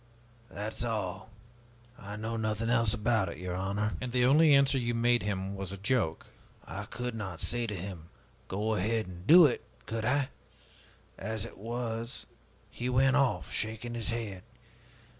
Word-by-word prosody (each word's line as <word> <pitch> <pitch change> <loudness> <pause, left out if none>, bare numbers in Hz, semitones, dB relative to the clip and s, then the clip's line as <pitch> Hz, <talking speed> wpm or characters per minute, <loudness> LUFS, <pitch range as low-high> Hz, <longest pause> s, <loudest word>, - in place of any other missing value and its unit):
That 105 +2 -5
is - - -2
all. 110 -3 -3 0.7
I 105 -2 -8
know 110 +2 -3
nothing 110 +1 -1
else 115 -3 +4
about 110 -4 +1
it, - - -7
your 90 -1 -4
honor!" 100 +3 -1
"And 125 -1 -3
the 125 0 +3
only 150 +4 +6
answer 140 -1 +5
you 120 -1 -1
made 120 +1 +3
him 100 -1 -2
was 95 -1 -5
a 100 - -5
joke?" 100 -5 0 0.4
"I - - -6
could 125 0 -4
not 95 -6 -5
say 120 -1 -1
to 105 - -3
him, 90 -3 -7 0.4
'Go 105 +3 -1
ahead 110 +2 0
and 90 +1 -10
do 170 +1 +10
it,' 135 - +1 0.2
could 110 0 -3
I? 140 +2 +2 0.9
As 110 +1 -3
it - - -11
was 115 +1 -4 0.5
he 125 +1 -3
went 130 +2 +4
off, 140 -3 +1
shaking 110 +2 -2
his 115 -2 -1
head. 110 -5 -3
110 Hz, 170 wpm, -31 LUFS, 100-120 Hz, 0.9 s, do